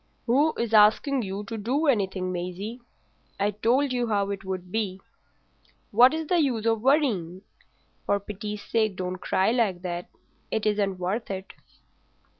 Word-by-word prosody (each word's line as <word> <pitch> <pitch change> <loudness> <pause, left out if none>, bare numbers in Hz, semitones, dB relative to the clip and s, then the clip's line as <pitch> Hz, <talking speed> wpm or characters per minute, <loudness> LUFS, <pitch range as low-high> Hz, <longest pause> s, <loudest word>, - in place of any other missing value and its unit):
"Who 285 +6 +3
is 235 -1 -2
asking 220 +6 +5
you 195 -1 -4
to 225 +1 -6
do 260 +9 0
anything, 190 -8 +1
Maisie? 185 +7 -5 0.6
I 205 +1 +2
told 250 +6 +1
you 245 -1 0
how 200 -2 0
it 195 -1 -5
would 185 -1 -5
be. 200 -3 -2 0.9
What's 260 +9 +5
the 350 +3 +2
use 240 -7 0
of 225 -1 +2
worrying? 215 - +1 0.6
For 200 - +2
pity's 210 +1 -6
sake 220 -3 0
don't 185 0 -3
cry 190 +2 +1
like 210 -7 0
that; 175 -1 -4 0.4
it 220 -1 -2
isn't 205 -3 +1
worth 190 +6 -3
it." 190 -1 -6
210 Hz, 150 wpm, -26 LUFS, 190-235 Hz, 0.9 s, asking